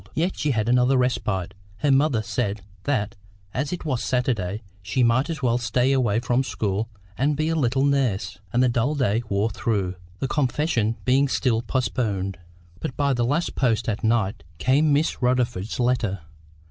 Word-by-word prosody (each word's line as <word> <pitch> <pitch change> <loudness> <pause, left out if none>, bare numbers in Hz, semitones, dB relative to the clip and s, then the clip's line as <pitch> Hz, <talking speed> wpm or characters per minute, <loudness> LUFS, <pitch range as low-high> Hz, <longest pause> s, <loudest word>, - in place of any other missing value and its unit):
Yet 175 +4 0
she 150 - -1
had 110 -5 0
another 125 +2 +4
respite; 105 -7 0 0.2
her 145 +3 +2
mother 135 -5 +3
said 110 -3 -2 0.2
that, 110 -7 0 0.4
as 140 +4 -2
it 180 -2 -5
was 130 -5 -1
Saturday, 110 -4 -1 0.2
she 110 +7 0
might 120 +5 +3
as 155 -4 -4
well 120 -1 +2
stay 125 +2 +1
away 120 -5 +2
from 125 +2 +1
school 110 -3 -2 0.3
and 145 +2 +2
be 155 +1 0
a 165 - +1
little 135 -2 +2
nurse. 130 -9 0
And 125 +2 +3
the - - +4
dull 120 +5 +1
day 120 -5 +1
wore 100 +3 +1
through; 100 -4 -1 0.2
the 135 - -2
confession 130 -5 0
being 135 +2 +4
still 125 -4 +1
postponed. 105 -6 -1 0.4
But 130 - -5
by 140 -1 +2
the 120 -2 +1
last 150 +7 0
post 120 -3 +1
at 105 -2 -2
night 110 -6 +1
came 140 - +3
Miss 145 0 +1
Rutherford's 125 -5 0
letter. 120 -6 +1
125 Hz, 170 wpm, -24 LUFS, 110-135 Hz, 0.4 s, another